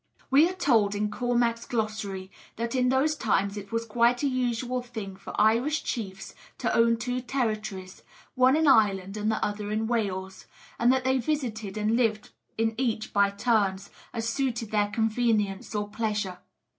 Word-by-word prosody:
We 295 +6 +6
are - - -4
told 225 - +2
in 210 +1 -1
Cormac's 240 0 0
Glossary 215 -4 -3 0.2
that 230 +1 -3
in 250 -1 +2
those 275 +4 +2
times 200 -6 0
it 200 0 -8
was 230 0 -1
quite 235 +3 +2
a - - +3
usual 250 -1 -1
thing 220 -6 -7
for 195 - -7
Irish 235 +8 +3
chiefs 195 -6 -5 0.2
to - - -1
own 230 0 +4
two 245 +1 -2
territories, 215 -7 -3 0.3
one 255 +2 +4
in 315 0 +2
Ireland 195 -6 +3
and 215 +1 0
the 220 - 0
other 205 0 -4
in 215 +1 -1
Wales; 190 -5 -2 0.3
and 240 +1 +5
that 260 0 +1
they 260 0 +2
visited 230 -7 -3
and 215 +2 +1
lived 225 -3 0 0.3
in 225 0 +1
each 225 -4 -1
by 200 -1 +4
turns, 200 -2 0 0.2
as 225 -1 -3
suited 230 -3 -2
their 210 -1 +2
convenience 220 -2 0
or 205 0 -1
pleasure. 210 -3 -2
225 Hz, 170 wpm, -27 LUFS, 205-245 Hz, 0.3 s, We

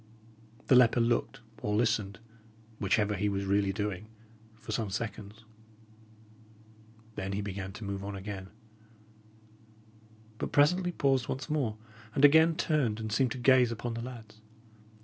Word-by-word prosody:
The - - +3
leper 125 -1 +6
looked 115 -1 0 0.2
or 105 - -1
listened, 105 -3 0 0.6
whichever 105 +1 +1
he 105 +1 0
was 100 0 -2
really 100 0 +2
doing, 105 0 -4 0.5
for 110 0 -9
some 110 -1 -1
seconds. 105 +1 -6 1.7
Then 95 -2 -4
he 100 - -2
began 100 -1 -5
to 110 - -9
move 100 -1 -4
on 100 0 -5
again, 95 -1 -7 1.9
but - - -3
presently 180 +5 +3
paused 135 -6 +1
once 135 +4 -4
more, 130 -8 -1 0.4
and 140 - +6
again 160 +3 +6
turned 140 -10 0
and 110 -1 -5
seemed 125 +3 +1
to - - -7
gaze 125 -1 +4
upon 115 +1 -4
the 115 - -4
lads. 115 -3 -10
110 Hz, 140 wpm, -30 LUFS, 100-125 Hz, 1.9 s, leper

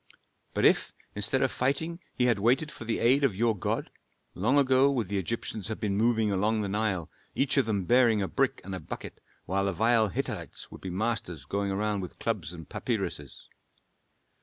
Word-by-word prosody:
But - - +2
if - - +3 0.2
instead 105 +6 +2
of 130 - +1
fighting 160 +6 -1 0.2
he 125 - +1
had 120 -4 +3
waited 130 +8 +2
for 115 - -9
the 115 - 0
aid 130 +5 +3
of 125 -8 +2
your 115 +2 +2
God, 95 - -2 0.4
long 120 +10 +2
ago 135 0 +5
would 120 -9 -1
the 100 -1 0
Egyptians 105 0 -3
have 110 - -4
been 100 -2 -1
moving 110 0 +2
along 105 +3 +1
the 100 - -2
Nile, 100 -4 -1 0.2
each 135 -1 +2
of 135 -4 +3
them 100 -4 0
bearing 120 -1 +4
a 95 - 0
brick - - 0
and 95 - -6
a 95 - -3
bucket, - - -8 0.2
while 100 +2 0
the 100 - 0
vile 110 +4 +3
Hittites 95 - -4
would - - -11
be 95 - -5
masters 95 -5 -2
going 100 0 -1
around 105 +1 -1
with 90 - -8
clubs 100 -8 -2
and 80 -3 -10
papyruses. - - -4
110 Hz, 195 wpm, -28 LUFS, 100-120 Hz, 0.4 s, ago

